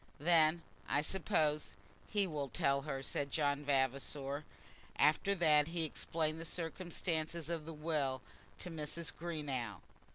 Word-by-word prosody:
"Then, 165 +1 +4 0.3
I 145 - +2
suppose, 155 -3 +1 0.3
he 205 -2 +2
will 150 -6 -3
tell 140 +3 +2
her," 135 -2 -4
said 140 +1 -1
John 145 0 +1
Vavasor. 140 +1 0 0.5
After 155 +6 +4
that 155 -4 +5
he 165 0 -1
explained 160 0 -1
the - - -4
circumstances 165 -1 -2
of 165 -3 -2
the - - -4
will 150 -5 -1 0.3
to 180 - -6
Mrs. 160 +1 -2
Greenow. 140 - -3
155 Hz, 130 wpm, -36 LUFS, 140-165 Hz, 0.5 s, that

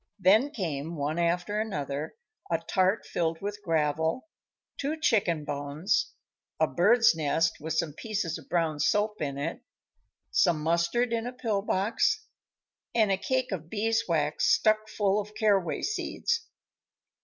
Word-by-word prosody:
Then 210 +8 +4
came, 165 - -4
one 150 +2 -2
after 175 +4 0
another, 145 - -4 0.3
a 165 - +2
tart 185 +5 +1
filled 165 -1 -1
with 205 +1 -5
gravel, 160 - 0 0.5
two 300 +3 -2
chicken 175 - +1
bones, 145 +7 -1 0.5
a - - +5
bird's 225 +6 +4
nest 160 +1 0
with 160 +1 -3
some 160 -2 0
pieces 200 -3 -3
of - - -17
brown 165 -4 0
soap 210 +4 +1
in 140 -2 -2
it, 140 - -3 0.7
some 170 -3 +3
mustard 170 +9 +1
in 230 +1 -1
a - - -3
pill 225 -5 -1
box, 215 - +1 0.7
and 215 -3 +4
a - - +4
cake 255 +5 -1
of 165 -4 -5
beeswax 205 -9 0
stuck 215 0 +3
full 205 -1 +1
of 210 +1 -12
caraway 195 -6 +1
seeds. 460 +2 -1
185 Hz, 140 wpm, -28 LUFS, 160-220 Hz, 0.7 s, a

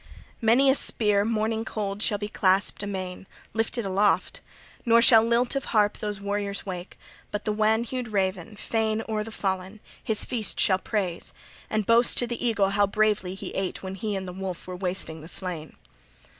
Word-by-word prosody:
Many 235 +5 +4
a 265 - +6
spear 210 -6 +3
morning 220 0 -1
cold 205 -2 -4
shall 210 - +2
be 205 0 -4
clasped 195 -1 +2
amain, 190 -2 -5 0.3
lifted 225 0 -1
aloft; 195 +2 +1 0.4
nor 230 -1 +5
shall 230 -1 +7
lilt 235 +3 +2
of 275 - -2
harp 210 -2 +1
those 210 -2 -3
warriors 200 0 -3
wake; 180 -1 -7 0.3
but 210 - -5
the 215 - +1
wan 215 +2 +2
hued 250 0 -4
raven, 190 -2 -2
fain 220 0 -1
o'er 215 -1 -1
the 225 - -9
fallen, 190 0 -3 0.2
his 220 -2 -2
feast 230 -4 -3
shall 190 -1 +3
praise 185 -4 -2 0.4
and 215 -1 0
boast 230 +3 +4
to 245 - +4
the 240 0 -5
eagle 205 -5 +2
how 200 0 +3
bravely 210 -3 0
he - - -7
ate 190 0 -3
when 190 0 -5
he 205 +2 -3
and 190 -1 -4
the 180 - -6
wolf 190 -1 -5
were 185 - -6
wasting 180 -3 -2
the 160 - -10
slain." 170 -3 -1
205 Hz, 185 wpm, -26 LUFS, 190-225 Hz, 0.4 s, shall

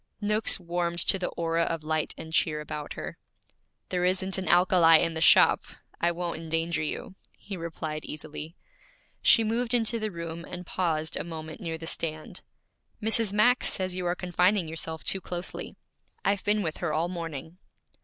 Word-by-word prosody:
Noakes 210 0 +2
warmed 170 -1 -2
to 195 - +3
the 180 - -1
aura 165 0 -1
of 165 -1 -1
light 155 0 -1
and 160 0 -8
cheer 155 -1 +2
about 150 -1 -5
her. - - -7 0.7
'There 180 -1 0
isn't 190 +1 +1
an 185 - -4
alkali 175 -2 +6
in 165 -1 0
the 160 - -3
shop; - - +7 0.4
I 170 - +3
won't 170 -1 -3
endanger 165 +1 -1
you,' 155 +4 -4 0.2
he 200 - -7
replied 160 -3 -5
easily. 155 +2 -7 0.7
She 230 - +6
moved 235 +2 0
into 230 0 +1
the 215 0 -2
room 170 -2 -6
and 180 +1 -7
paused 160 -3 -1
a - - -3
moment 160 -1 -7
near 165 -2 -3
the 165 - -8
stand. 155 -1 -4 0.6
'Mrs. 220 -1 +3
Max 240 +5 +4
says 185 -1 0
you 180 -1 -2
are 175 - +1
confining 180 +1 +2
yourself 160 0 -4
too 190 - +1
closely. 175 0 -5 0.5
I've 200 0 +1
been 210 0 +2
with 160 -2 -3
her 170 -3 -2
all 160 +3 +1
morning.' 165 -1 -6
170 Hz, 175 wpm, -28 LUFS, 160-185 Hz, 0.7 s, shop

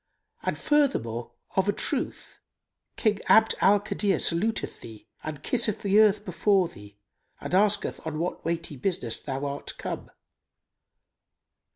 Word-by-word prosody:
And - - -2
furthermore, 120 - 0 0.2
of 190 +1 +2
a - - +6
truth, - - -3 0.6
King 210 -3 +1
Abd 220 0 +6
al 205 +1 +6
Kadir 205 -1 0
saluteth 210 +7 -1
thee 110 -2 -11 0.2
and 155 -2 -6
kisseth 230 -4 +1
the 200 +1 +4
earth 210 -1 +4
before 195 -6 +2
thee 105 -6 -14 0.4
and - - -6
asketh 205 +2 +2
on 160 -1 -4
what 175 +3 -3
weighty 165 -3 -3
business 125 - -1
thou 135 0 -4
art 140 0 -5
come. - - -5
190 Hz, 135 wpm, -27 LUFS, 145-210 Hz, 0.6 s, a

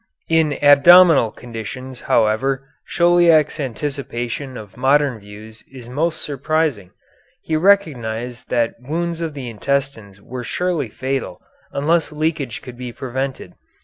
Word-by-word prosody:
In 160 -2 +3
abdominal 145 -1 +7
conditions, 120 +3 -8
however, 135 +5 +1 0.2
Chauliac's 170 -3 +3
anticipation 130 -1 -4
of 105 -3 -11
modern 135 -1 +2
views 105 +2 -13
is 125 -3 -11
most 155 +6 -2
surprising. 145 - -1 0.5
He 160 - -2
recognized 125 - 0
that 115 -1 0
wounds 170 +5 -3
of 160 -3 -4
the 135 -3 -6
intestines 115 -4 -3
were 125 +5 -7
surely 180 +4 -2
fatal 135 +1 -4 0.3
unless 160 +3 +1
leakage 150 -5 -2
could 125 -1 -10
be 125 -1 -5
prevented. 130 +2 -5
135 Hz, 115 wpm, -20 LUFS, 120-155 Hz, 0.5 s, abdominal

